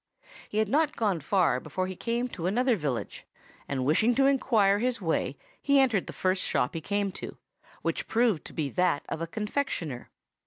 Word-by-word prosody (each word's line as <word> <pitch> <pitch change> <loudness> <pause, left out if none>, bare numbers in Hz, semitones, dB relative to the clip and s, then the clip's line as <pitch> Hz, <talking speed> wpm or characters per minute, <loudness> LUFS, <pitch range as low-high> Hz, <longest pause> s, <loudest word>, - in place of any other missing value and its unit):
"He 210 - -4
had 215 0 +3
not 300 +7 +2
gone 205 -6 +1
far 160 -4 +2
before 160 +6 -3
he 185 0 -5
came 235 +5 -1
to 175 -6 -4
another 245 +5 +2
village, 145 - -3 0.4
and 130 -2 -2
wishing 215 - +3
to 270 - +4
inquire 220 -7 +3
his 250 +2 0
way 165 -5 -1 0.2
he 280 -1 +4
entered 245 -8 +2
the - - -5
first 185 0 0
shop 125 - 0
he 165 - -4
came 200 +3 -1
to, - - -8 0.5
which - - -2
proved 225 -7 +2
to - - -10
be 155 -3 -1
that 180 -3 +1
of 160 - -4
a 165 - -2
confectioner. 205 - -3
200 Hz, 190 wpm, -28 LUFS, 165-235 Hz, 0.5 s, to